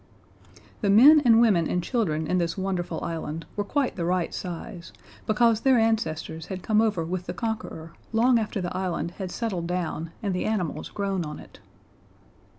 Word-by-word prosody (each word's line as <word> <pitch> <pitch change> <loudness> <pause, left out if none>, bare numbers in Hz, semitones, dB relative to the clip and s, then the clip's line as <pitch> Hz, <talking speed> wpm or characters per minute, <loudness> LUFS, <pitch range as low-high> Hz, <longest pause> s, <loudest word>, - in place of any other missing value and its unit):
The 205 - +1
men 280 +10 +8
and 230 -2 +6
women 200 -9 +4
and 180 - 0
children 165 - -1
in 180 +3 +1
this 170 +1 -1
wonderful 190 -2 -2
island 165 -1 -4
were 205 - -1
quite 270 +5 -1
the 170 - -2
right 175 0 0
size, 175 0 -7 0.4
because 225 0 +3
their 265 -2 +4
ancestors 165 -8 -1
had 190 -2 -6
come 215 0 +3
over 210 -7 0
with 180 +1 -4
the 175 - -4
Conqueror 180 -5 -5 0.2
long 235 +2 +4
after 210 -2 -3
the 175 0 -4
island 180 -3 -2
had 185 - -3
settled 185 -5 -3
down 170 -2 -3
and 200 -2 0
the 180 - -2
animals 200 -7 -2
grown 195 -3 -2
on 150 -1 -6
it. - - -14
185 Hz, 175 wpm, -26 LUFS, 170-220 Hz, 0.4 s, men